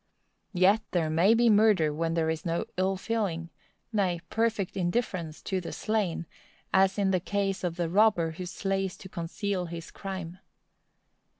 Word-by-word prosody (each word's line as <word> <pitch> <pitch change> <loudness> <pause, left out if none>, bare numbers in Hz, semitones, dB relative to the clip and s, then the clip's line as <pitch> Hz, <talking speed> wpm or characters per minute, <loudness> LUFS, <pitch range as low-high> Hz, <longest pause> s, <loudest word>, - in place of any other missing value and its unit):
Yet 195 +5 +5
there 165 -3 +1
may 180 +8 +5
be 235 +1 +4
murder 210 -8 +4
when 165 +2 -1
there 160 -1 +1
is 160 +1 -4
no 170 -2 -1
ill 190 +1 +1
feeling,—nay, 180 -1 -3
perfect 225 -5 0
indifference 175 -4 -2
to 190 -2 -1
the 175 - -6
slain,—as 190 -1 -1
in 195 -2 +2
the 185 - +2
case 195 +1 -1
of 175 -2 -1
the 175 -1 -1
robber 185 -3 +3
who 180 +3 -6
slays 195 0 -2
to - - -10
conceal 180 +2 -3
his 165 0 -7
crime. 185 -3 -6
185 Hz, 145 wpm, -28 LUFS, 170-200 Hz, -, Yet